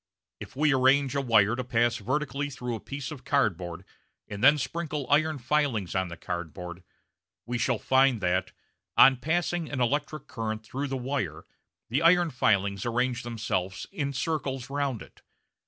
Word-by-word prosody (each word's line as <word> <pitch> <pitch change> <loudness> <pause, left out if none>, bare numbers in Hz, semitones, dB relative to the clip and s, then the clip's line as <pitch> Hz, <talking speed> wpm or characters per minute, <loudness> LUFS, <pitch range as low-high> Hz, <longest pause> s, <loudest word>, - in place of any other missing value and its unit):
If - - -10
we 145 +1 +3
arrange 135 +1 +3
a 140 - 0
wire 110 -4 +4
to 130 - -3
pass 120 -1 +1
vertically 140 +4 -2
through 125 -3 -5
a 115 - -4
piece 140 +4 -6
of 140 -4 -9
cardboard 95 - -1 0.4
and 105 +2 -6
then 145 +3 +7
sprinkle 150 -1 -3
iron 155 +1 +3
filings 130 - 0
on 95 -1 0
the 85 -1 -8
cardboard 90 +1 -6 0.6
we 120 0 -3
shall 125 -1 +1
find 130 +2 +3
that, 95 0 0 0.5
on 130 0 +8
passing 170 +3 -1
an 135 - -3
electric 145 +4 -1
current 110 -1 -4
through 140 +6 -3
the 135 -1 -3
wire, 120 - -3 0.4
the 130 +6 +1
iron 170 0 +5
filings 100 -6 +1
arrange 120 +1 0
themselves 105 -6 -3
in 145 -8 -2
circles 135 -2 -3
round 140 -5 -2
it. - - -19
130 Hz, 160 wpm, -28 LUFS, 110-145 Hz, 0.6 s, on